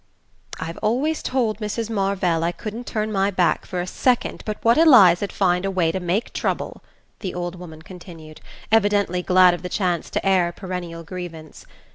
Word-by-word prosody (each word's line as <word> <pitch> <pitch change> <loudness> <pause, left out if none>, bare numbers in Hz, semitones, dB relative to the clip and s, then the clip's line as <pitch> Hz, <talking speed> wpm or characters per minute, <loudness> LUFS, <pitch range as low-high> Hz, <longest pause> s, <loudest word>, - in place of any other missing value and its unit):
"I've 165 +1 -6
always 265 +9 0
told 230 -5 -1
Mrs. 215 +1 -3
Marvell 195 -6 0
I 170 - +1
couldn't 220 +7 -7
turn 215 0 -2
my 195 -1 +1
back 180 -3 0
for 180 - -4
a - - -3
second 245 +6 0
but 215 - -3
what 230 +1 +5
Eliza'd 205 - +6
find 180 -2 +1
a 195 - -1
way 180 -4 +1
to 190 - -3
make 180 +5 -2
trouble," - - -3 0.4
the 190 -4 -5
old 175 0 -3
woman 160 -3 -11
continued, 165 -4 -12 0.3
evidently 205 -4 +2
glad 180 0 +5
of 175 - -5
the 180 - -5
chance 180 -4 -1
to - - -3
air 190 -3 +3
a 170 - -6
perennial 175 -3 -6
grievance. 165 -3 -9
185 Hz, 180 wpm, -22 LUFS, 175-210 Hz, 0.4 s, Eliza'd